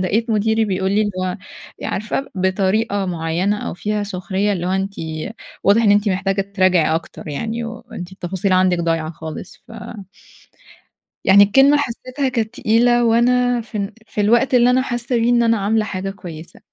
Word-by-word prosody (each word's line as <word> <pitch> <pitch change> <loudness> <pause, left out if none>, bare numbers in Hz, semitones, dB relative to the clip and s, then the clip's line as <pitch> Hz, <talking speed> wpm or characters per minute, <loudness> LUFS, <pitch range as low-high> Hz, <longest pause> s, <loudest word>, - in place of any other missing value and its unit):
لاقيت 220 +5 0
مديري 220 +1 +2
بيقول 190 -1 -1
لي 210 - +2
اللي 210 -1 0
هو 180 +2 -2 0.5
عارفة 215 +7 -3
بطريقة 195 +2 0
معيّنة 175 +4 -1
أو - - -5
فيها 210 +2 -2
سخرية، 195 +1 -2
اللي 180 -2 -3
هو - - -1
"أنتِ 195 +1 -1 0.7
واضح 205 +4 +4
إن 205 - +4
أنتِ 205 +1 +3
محتاجة 195 +1 0
تراجعي 185 -5 +3
أكتر 165 -1 -6
يعني، 225 +10 -3
وأنتِ 230 -6 -8
التفاصيل 190 +1 -2
عندِك 185 -1 +3
ضايعة 165 -2 -1
خالص." 160 +1 -9
ف - - -12 1.5
يعني 200 +1 +7
الكلمة 270 +8 +5
حسّيتها 260 +1 -2
كانت 225 -3 -2
تقيلة، 240 +2 +3
وأنا 245 +1 +3
في 220 -1 -8
ال 200 +1 -3
في 210 - -2
الوقت 240 +6 +3
اللي 245 0 +5
أنا 255 +1 +3
حاسّة 240 -1 -2
بيه 230 +1 +2
إن 240 -1 +4
أنا 230 -1 +3
عاملة 215 +2 +1
حاجة 195 -1 -4
كويسة. 175 -4 -10
205 Hz, 170 wpm, -19 LUFS, 185-230 Hz, 1.5 s, يعني